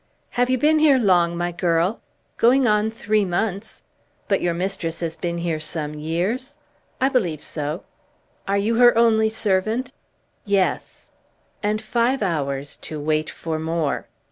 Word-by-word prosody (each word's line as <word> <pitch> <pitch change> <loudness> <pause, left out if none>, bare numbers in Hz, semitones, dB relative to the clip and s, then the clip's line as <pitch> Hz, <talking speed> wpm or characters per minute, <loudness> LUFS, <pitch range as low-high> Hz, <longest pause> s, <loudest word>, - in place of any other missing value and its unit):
"Have 245 +1 +1
you 255 - +2
been 310 +4 +3
here 300 -3 +5
long, 175 -7 +3
my 175 0 -1
girl?" 175 +3 0 0.4
"Going 250 +2 +4
on 210 0 +2
three 215 -1 0
months." 200 +3 -3 0.4
"But - - +1
your 170 -1 0
mistress 175 -2 -3
has 165 -1 -3
been 170 -1 -3
here 170 -2 -2
some 155 -1 -4
years?" 185 - -3 0.4
"I 265 - +3
believe 175 - 0
so." 150 +3 -4 0.6
"Are 200 +1 +1
you 220 +3 +1
her 240 -1 +6
only 220 -1 +4
servant?" 220 +4 0 0.5
"Yes." 200 -2 -1 0.5
And 210 0 0
five 235 +2 +1
hours 140 -6 -2
to 155 - -7
wait 155 +1 0
for 160 -1 -4
more! 160 -2 -2
195 Hz, 145 wpm, -22 LUFS, 165-230 Hz, 0.6 s, her